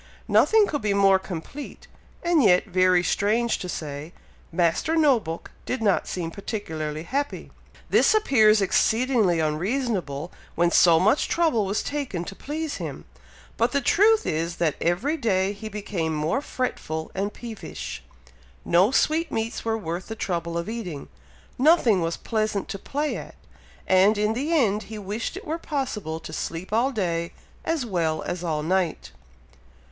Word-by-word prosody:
Nothing 440 -1 +5
could 290 -7 -3
be 205 -1 0
more 195 -1 +5
complete, 190 - -8 0.4
and 340 -3 +3
yet, 180 -6 +5
very 185 -2 +3
strange 220 +6 +1
to 180 - -5
say, 150 0 -6 0.4
Master 175 - +1
No 295 -6 +5
book 165 -4 -7 0.2
did 255 - -1
not 205 -4 +1
seem 170 -3 -3
particularly 160 -7 -4
happy! 280 +10 -3 0.4
This - - +4
appears 220 - +4
exceedingly 220 -3 +2
unreasonable, 175 - -1 0.2
when 170 +1 +2
so 170 -2 +6
much 215 +9 +3
trouble 280 - +1
was 200 +2 -1
taken 275 -12 -3
to 195 - -7
please 305 +4 -4
him; - - -6 0.5
but 230 +2 +1
the 280 - +3
truth 425 - +4
is, 165 +2 -1
that 165 -4 +1
every 225 - 0
day 195 -7 +1
he 215 +2 -7
became 195 -6 -3
more 155 - 0
fretful 160 - -4
and 200 +2 -2
peevish. 225 -1 -7 0.6
No 180 +4 +4
sweetmeats 265 -5 0
were 225 -1 0
worth 175 -2 -5
the 225 - -5
trouble 170 -5 -2
of 170 - -3
eating, 205 -11 -6 0.5
nothing 260 - +4
was 165 0 -1
pleasant 215 -3 -1
to 195 - -5
play 295 +8 -2
at, - - -9 0.5
and 190 +3 +4
in 210 +1 +1
the 280 +8 -2
end 220 -10 +2
he 220 - -6
wished 210 - -4
it 390 - -9
were 320 +1 -3
possible 220 - -3
to - - -9
sleep 180 +5 -5
all 240 +5 +2
day, 170 -7 -2 0.3
as 320 -6 -1
well 165 -7 -1
as 175 0 -4
all 155 -3 -1
night. 180 0 -1
205 Hz, 155 wpm, -25 LUFS, 170-255 Hz, 0.6 s, so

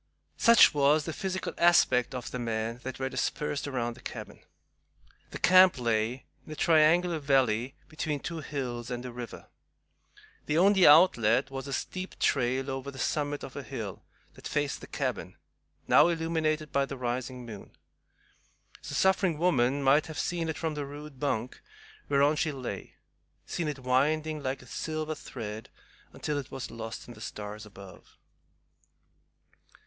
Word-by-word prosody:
Such 230 -1 +7
was 145 +1 +3
the 160 - -4
physical 190 +1 -3
aspect 130 -8 +4
of 125 - -5
the 125 - -4
men 115 0 -2
that 130 +1 -6
were 130 - -2
dispersed 145 +1 -2
around 120 -4 -2
the - - -16
cabin. - - -8 0.9
The - - -6
camp 185 -2 +6
lay 115 +1 -1 0.2
in - - -12
a - - -5
triangular 165 +2 +4
valley 135 -3 +1
between 155 -2 -3
two 165 +3 -5
hills 125 -5 -4
and 125 0 -4
a 125 - -5
river. 120 -1 -8 1.0
The 150 - +1
only 190 +1 +6
outlet 135 - +5
was 135 0 -5
a - - -6
steep 185 +6 -4
trail 130 +1 +1
over 135 +1 -4
the 135 - -10
summit 145 +1 -1
of - - -8
a - - -4
hill - - -6 0.3
that - - -9
faced 145 -1 -1
the - - -10
cabin, - - -3 0.5
now - - +6
illuminated 160 -2 -1
by 140 0 +1
the 135 - -6
rising 125 0 -4
moon. 105 -4 -9 1.1
The - - -6
suffering 190 -3 +2
woman 140 -5 +2
might 140 +3 +4
have 160 -2 -8
seen 170 -2 -1
it 160 - -3
from 160 -1 -2
the 150 -1 -3
rude 145 -1 -10
bunk 125 -4 -2 0.5
whereon 145 +2 +3
she 155 - 0
lay, 130 -4 -7 0.5
seen 170 -3 -3
it 150 -2 -3
winding 150 +4 +1
like 130 -1 -3
a - - -15
silver 155 +6 -3
thread 110 -6 -7 0.4
until 150 -1 -3
it 140 -1 -8
was 135 -1 -6
lost 115 -1 -7
in 120 - -9
the 105 - -14
stars 105 0 -7
above. 100 -2 -14
140 Hz, 160 wpm, -29 LUFS, 125-155 Hz, 1.1 s, Such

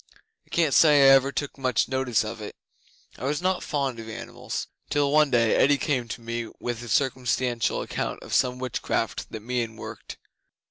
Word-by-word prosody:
I - - -26
can't 160 -5 +1
say 150 -2 +6
I - - +9
ever 135 0 +4
took 140 +1 -4
much 130 -3 +1
notice 130 -4 +1
of 110 0 -6
it 105 - -7 0.6
(I 125 - -5
was 145 +2 0
not 185 +1 0
fond 135 -5 -2
of 110 0 -8
animals), 110 +1 -6 0.2
till 145 -1 +1
one 150 0 +5
day 115 -3 +3
Eddi 145 +1 +4
came 130 -5 -1
to 115 - -6
me 115 0 -4
with 120 -1 -4
a 120 - -8
circumstantial 125 -1 0
account - - -4
of - - -8
some 125 0 +2
witchcraft 125 -2 -2
that 110 - -6
Meon 115 -1 -2
worked. - - -9
125 Hz, 185 wpm, -26 LUFS, 115-140 Hz, 0.6 s, I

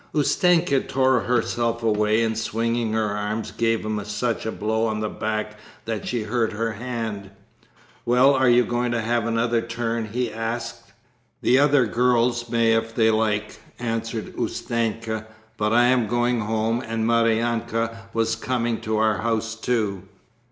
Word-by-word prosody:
Ustenka 165 0 +3
tore 130 -1 +2
herself 115 +1 0
away, 105 0 +2
and 110 0 0
swinging 115 +1 -1
her 110 -2 0
arm 105 +2 -2
gave 115 -1 +1
him 105 -1 -2
such 110 +2 -2
a - - -1
blow 110 +2 -1
on 110 -1 -2
the 105 0 -2
back 110 0 -3 0.3
that 110 -2 -4
she 120 -3 -1
hurt 115 0 -1
her 115 +2 -1
hand. 110 -3 -5 0.7
"Well, 125 +3 +5
are 130 -2 +3
you 120 0 +5
going 120 0 -1
to 115 - 0
have 115 +1 0
another 115 0 +1
turn?" 115 -1 -3
he 120 +3 -2
asked. 115 0 -5 0.5
"The 130 - +4
other 145 -3 +4
girls 120 0 +1
may 115 -1 +3
if 115 0 -1
they 110 -1 +4
like," 105 -1 -1 0.2
answered 115 -1 -3
Ustenka, 115 -1 -2 0.3
"but 105 -1 0
I 120 +1 +5
am 125 -2 +3
going 120 +2 +1
home 110 +2 0
and 115 0 -2
Maryanka 115 0 0
was 115 0 0
coming 120 0 -2
to 110 0 -1
our 110 -1 +2
house 115 +1 -1
too." 110 -4 -1
115 Hz, 155 wpm, -23 LUFS, 110-120 Hz, 0.7 s, Well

